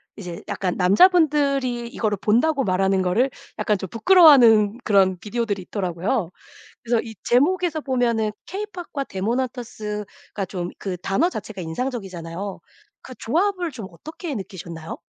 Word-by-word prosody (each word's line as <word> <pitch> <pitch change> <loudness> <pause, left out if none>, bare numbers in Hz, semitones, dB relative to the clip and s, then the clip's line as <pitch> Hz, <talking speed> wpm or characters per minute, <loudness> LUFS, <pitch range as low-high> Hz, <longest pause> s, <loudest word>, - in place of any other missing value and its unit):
이제 180 -5 -8
약간 185 -2 -2
남자분들이 275 - +3
이거를 215 -5 -2
본다고 270 +6 +2
말하는 190 0 +2
거를 215 +9 +2 0.3
약간 210 -3 +1
좀 190 -2 -6
부끄러워하는 235 - +6
그런 190 -3 +3
비디오들이 210 -1 -3
있더라고요. 185 +1 -2 0.5
그래서 235 -1 +1
이 225 -2 -9
제목에서 320 +5 +2
보면은 235 -5 0 0.2
케이팝과 360 -8 -5
데몬 220 +6 -1
헌터스가 220 -2 -6
좀 175 -2 -4
그 190 -3 -4
단어 195 - +1
자체가 215 - -7
인상적이잖아요. 190 -2 -5 0.4
그 255 - -10
조합을 355 - 0
좀 220 -6 -7
어떻게 310 - -7
느끼셨나요? 170 -5 -7
225 Hz, 355 characters per minute, -23 LUFS, 190-275 Hz, 0.5 s, 부끄러워하는